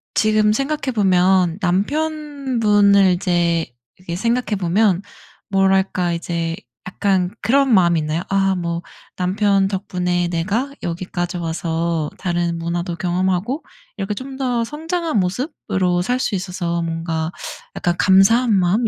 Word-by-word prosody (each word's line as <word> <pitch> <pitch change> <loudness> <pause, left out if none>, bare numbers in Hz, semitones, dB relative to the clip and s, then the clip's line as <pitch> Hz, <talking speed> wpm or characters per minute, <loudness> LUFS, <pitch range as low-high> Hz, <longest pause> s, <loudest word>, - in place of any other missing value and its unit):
지금 215 -1 +3
생각해 275 +1 -1
보면 185 -3 +3
남편분을 220 - +2
이제 175 -2 +1 0.3
이렇게 175 -2 -6
생각해 235 0 0
보면 190 +1 +2 0.5
뭐랄까 190 -2 +2
이제 170 -1 -2 0.3
약간 185 -1 0
그런 265 +2 +3
마음이 170 -4 +4
있나요? 155 +2 -2
아 195 -1 +2
뭐 170 -1 -3 0.4
남편 195 +1 +2
덕분에 180 -3 -1
내가 205 +11 -1
여기까지 175 +1 -3
와서 165 -1 -2
다른 175 -2 -1
문화도 170 +1 -3
경험하고 185 - -1 0.3
이렇게 195 +1 -2
좀 265 +3 -7
더 245 -3 0
성장한 320 - -2
모습으로 185 - -1
살 250 +5 0
수 210 - -1
있어서 180 -2 -2
뭔가 165 0 -2 0.4
약간 175 0 0
감사한 215 +5 +5
마음 195 +5 +2
190 Hz, 275 characters per minute, -20 LUFS, 175-220 Hz, 0.5 s, 감사한